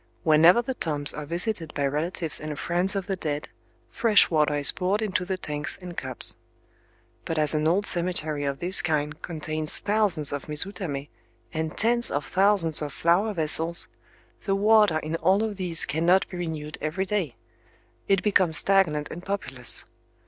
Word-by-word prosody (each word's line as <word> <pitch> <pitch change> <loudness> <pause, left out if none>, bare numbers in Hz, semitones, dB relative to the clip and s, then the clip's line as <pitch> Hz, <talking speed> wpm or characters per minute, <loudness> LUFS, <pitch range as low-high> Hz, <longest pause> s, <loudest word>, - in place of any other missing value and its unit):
Whenever 165 +8 +5
the 260 - -4
tombs 150 - +1
are 150 -1 -7
visited 170 0 -3
by 140 - -1
relatives 155 +1 -2
and 155 -1 -6
friends 180 +6 0
of 195 -2 -3
the 195 -1 -3
dead, 150 -4 -5 0.4
fresh 220 -6 +3
water 150 -2 +1
is 145 -1 +4
poured 190 +3 -1
into 195 -4 -2
the 190 0 -3
tanks 150 -3 -2
and 180 -2 -9
cups. 130 -5 +1 0.9
But 165 - -4
as 150 0 +6
an 155 0 0
old 190 +5 +1
cemetery 170 -5 0
of 140 -1 -3
this 180 +4 +3
kind 150 -1 -2
contains 155 -2 -2
thousands 200 -8 +1
of 145 +1 -6
mizutamé, 150 -2 -4 0.4
and 160 -1 -4
tens 235 +2 +2
of 145 0 -3
thousands 190 -4 +2
of 150 -1 -4
flower 175 +9 +1
vessels 165 +1 +4 0.6
the 195 - 0
water 210 -4 +3
in 155 +1 -4
all 190 +6 +2
of 215 -3 -4
these 175 -3 0
cannot 175 +5 +1
be 180 - -8
renewed 155 -3 -6
every 165 +5 -2
day. 185 - -3 0.7
It 195 -1 +1
becomes 185 -6 +3
stagnant 165 -7 +1
and 175 - -8
populous. 135 - -2
165 Hz, 165 wpm, -25 LUFS, 150-195 Hz, 0.9 s, as